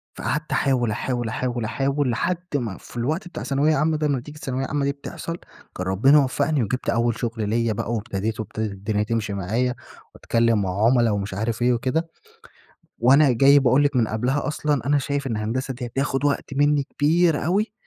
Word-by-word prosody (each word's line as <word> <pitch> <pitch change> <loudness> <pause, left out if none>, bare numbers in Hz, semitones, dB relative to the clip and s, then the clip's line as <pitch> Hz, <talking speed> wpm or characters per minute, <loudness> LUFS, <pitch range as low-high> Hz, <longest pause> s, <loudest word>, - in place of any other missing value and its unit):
فقعدت - - -3
أحاول، 125 -5 +1
أحاول، 120 +1 -2
أحاول، 120 -1 -2
أحاول 135 +3 0
لحد 170 +9 0 0.2
ما 115 -8 -2
في - - -12
الوقت 155 +9 -1
بتاع - - -7
ثانوية 145 +3 +2
عامة 155 +2 +1
ده، 150 -1 0
نتيجة 145 +2 -3
الثانوية 135 -3 -3
العامة 140 +1 -1
دي 140 - +1
بتحصل، 165 +4 -7 0.4
كان 90 - -4
ربنا 135 +11 +5
وفقني 140 0 0
وجبت 125 +5 -2
أول 115 0 +1
شغل 115 -3 -2
ليّا 115 0 +1
بقى 115 +3 -3
وابتديت 110 0 -3
وابتدت 110 0 -3
الدنيا 105 +2 -2
تمشي 110 -2 -2
معايا، 115 +7 -1 0.4
وأتكلّم 115 -2 +1
مع 95 +3 0
عُملا 120 -2 +4
ومش 100 -1 -2
عارف 110 +3 -2
إيه 125 0 +3
وكده، 150 +8 -1 0.9
وأنا 135 +3 +5
جاي 140 +4 +6
باقول 135 +1 +3
لِك 140 -2 +1
من 115 -3 +2
قبلها 125 +6 -1
أصلًا 145 -3 -1
أنا 145 0 +3
شايف 140 0 -2
إن 115 -4 -2
هندسة 125 +5 -2
دي 125 0 -5
هتاخد 135 +2 -2
وقت 140 -1 -1
مني 145 0 +3
كبير 155 +2 +1
أوي، 205 +6 0
125 Hz, 185 wpm, -23 LUFS, 115-145 Hz, 0.9 s, جاي